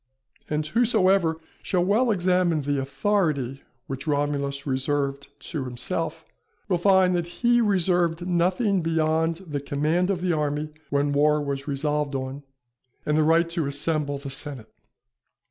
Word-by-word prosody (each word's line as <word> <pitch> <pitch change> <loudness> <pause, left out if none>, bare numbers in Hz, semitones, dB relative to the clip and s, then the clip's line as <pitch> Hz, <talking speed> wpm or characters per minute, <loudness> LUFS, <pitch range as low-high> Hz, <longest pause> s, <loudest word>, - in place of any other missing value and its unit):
And 150 0 -1
whosoever 190 -4 +2 0.2
shall 180 -2 0
well 225 +6 +3
examine 180 -5 +2
the 145 0 0
authority 140 - 0 0.2
which 135 +3 -6
Romulus 140 -1 -1
reserved 140 +1 -1 0.2
to 150 -6 -3
himself, 125 -1 -3 0.4
will 180 - +1
find 190 -1 +4
that 170 -1 -1 0.2
he 240 0 +5
reserved 175 -4 +1
nothing 185 +3 +1
beyond 160 0 +1
the 145 -2 -3
command 155 +6 0
of 185 -3 -1
the 180 -1 +1
army 150 0 -1 0.2
when 145 0 +1
war 150 +1 +3
was 140 -1 -4
resolved 145 0 -1
on, 135 +1 -4 0.6
and 150 - +1
the 155 - +4
right 165 +2 +4
to 165 -4 -1
assemble 145 0 0
the 140 0 -7
senate. 135 -5 -6
155 Hz, 140 wpm, -25 LUFS, 140-180 Hz, 0.6 s, he